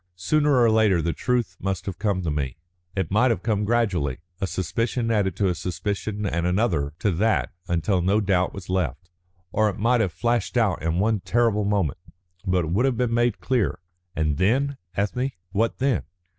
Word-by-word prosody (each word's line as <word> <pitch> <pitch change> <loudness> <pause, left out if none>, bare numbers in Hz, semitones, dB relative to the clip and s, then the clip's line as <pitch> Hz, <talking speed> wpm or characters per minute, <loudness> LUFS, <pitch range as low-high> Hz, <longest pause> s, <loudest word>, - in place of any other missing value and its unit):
Sooner 140 - +2
or 115 -2 +5
later 110 -5 +4
the 85 0 0
truth 120 -7 -1
must 95 -1 -3
have 95 -3 -5
come 100 -4 0
to 80 - -1
me. 70 -3 -2 0.4
It 95 -4 -2
might 120 +6 +4
have 115 - -1
come 105 -2 0
gradually, 95 - +1 0.2
a 95 - -1
suspicion 115 +6 -1
added 100 -5 +1
to 100 +1 +1
a 90 - +2
suspicion 100 +4 -3
and 85 -2 0
another 90 -7 +1
to 105 - +1
that 105 +6 +1 0.2
until 85 +2 +1
no 100 +4 +2
doubt 95 -3 +1
was 95 -2 -9
left. 90 -2 -2 0.4
Or 110 +2 +2
it 100 - -5
might 120 +3 +3
have 95 -5 0
flashed 120 +5 -1
out 105 -7 +2
in 80 +1 0
one 105 +2 +2
terrible 110 0 +1
moment. 95 -5 0 0.5
But 90 -2 +2
it 80 - -4
would 110 +9 +2
have 130 -4 +1
been 120 -1 0
made 120 -2 +1
clear. 115 - +1 0.4
And 75 -2 0
then, 135 - +1 0.2
Ethne? 125 +7 -1 0.2
What 110 +3 0
then? 135 -2 +1
100 Hz, 190 wpm, -24 LUFS, 90-115 Hz, 0.5 s, or